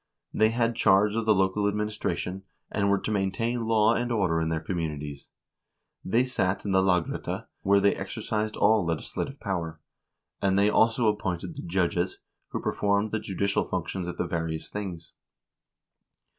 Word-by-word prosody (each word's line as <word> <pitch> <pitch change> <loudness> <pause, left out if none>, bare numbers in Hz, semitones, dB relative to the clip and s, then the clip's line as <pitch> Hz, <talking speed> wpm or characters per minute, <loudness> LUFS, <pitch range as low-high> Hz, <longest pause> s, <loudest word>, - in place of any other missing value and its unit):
They 110 0 +4
had 115 0 +1
charge 105 -1 +4
of 115 -1 -1
the 110 - +6
local 95 +2 +2
administration, 105 -3 -2 0.3
and 100 -1 +1
were 100 - +4
to 110 - -3
maintain 110 +4 -1
law 110 0 +4
and 120 +1 -1
order 95 -7 +1
in 80 - 0
their 80 -1 0
communities; 75 -4 -4 0.7
they 120 +6 +2
sat 100 -7 -1
in 100 - -1
the 95 0 +4
lagrette, 90 -3 0 0.2
where 100 +1 +4
they 100 0 +4
exercised 110 -1 -3
all 110 -2 +4
legislative 85 - -3
power, 85 -5 -3 0.6
and 95 0 +2
they 100 +1 +4
also 115 +2 +3
appointed 95 -4 -1
the - - -6
judges, 90 0 0 0.3
who - - -4
performed 100 +1 0
the 110 - 0
judicial 100 0 0
functions 90 -2 -3
at 90 -1 -5
the - - 0
various 80 -1 -3
things. 95 -5 -6
100 Hz, 155 wpm, -27 LUFS, 90-110 Hz, 0.7 s, the